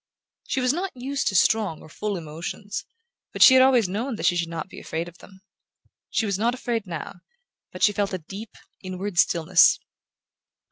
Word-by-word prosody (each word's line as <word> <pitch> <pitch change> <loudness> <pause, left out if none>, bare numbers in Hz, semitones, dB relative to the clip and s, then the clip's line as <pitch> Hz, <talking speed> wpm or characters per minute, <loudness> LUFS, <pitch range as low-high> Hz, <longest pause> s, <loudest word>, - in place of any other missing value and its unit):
She 265 - -1
was 255 +1 +2
not 360 -3 -4
used 270 +3 -2
to 195 - 0
strong 205 -4 +2
or - - -12
full 205 +6 -4
emotions; 170 +6 -6 0.5
but - - +5
she 260 - +9
had 260 - +7
always 255 -5 +5
known 225 +7 -3
that - - -4
she 175 - +4
should 170 -1 -1
not 165 0 -5
be - - -11
afraid 165 +2 -4
of 175 +1 -14
them. 190 -1 -17 0.7
She 225 - 0
was 200 -2 -1
not 235 +3 +1
afraid 230 -4 -3
now; 170 +1 -7 0.5
but - - -5
she 205 - +5
felt 200 0 -1
a 185 - -2
deep 195 +6 -10 0.2
inward 185 0 -4
stillness. 170 +1 +5
200 Hz, 190 wpm, -24 LUFS, 175-235 Hz, 0.7 s, she